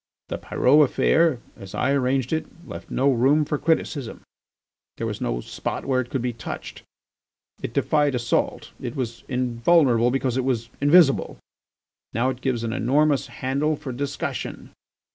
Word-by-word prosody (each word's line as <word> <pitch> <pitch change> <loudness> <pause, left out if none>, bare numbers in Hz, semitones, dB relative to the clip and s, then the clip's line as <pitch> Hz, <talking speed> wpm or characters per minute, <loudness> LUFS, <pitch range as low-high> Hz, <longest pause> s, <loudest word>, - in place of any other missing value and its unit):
The - - -4
Pyrot 145 +4 +3
affair, 150 0 +3
as 95 -1 -10
I - - +1
arranged 130 -1 +1
it, 160 - -1 0.2
left - - -9
no 140 +2 +2
room 135 +5 +3
for 145 0 -2
criticism; 150 -5 -1 0.8
there - - -3
was - - -4
no - - -1
spot - - -5
where 130 -1 +1
it 120 - -8
could 130 -3 -2
be 125 -1 -1
touched. 115 - -7 0.8
It - - -4
defied 145 -3 +1
assault. 120 -1 -1
It - - -5
was 120 -4 -4
invulnerable 125 0 +3
because 130 -1 0
it 130 - +1
was 120 -3 -1
invisible. 145 -1 +4 0.8
Now 125 +3 +1
it 130 0 -9
gives 125 -4 -1
an 115 -1 -2
enormous 140 +4 +2
handle 140 +4 -1
for 140 -2 -7
discussion. 140 +3 -4
130 Hz, 155 wpm, -24 LUFS, 120-145 Hz, 0.8 s, invisible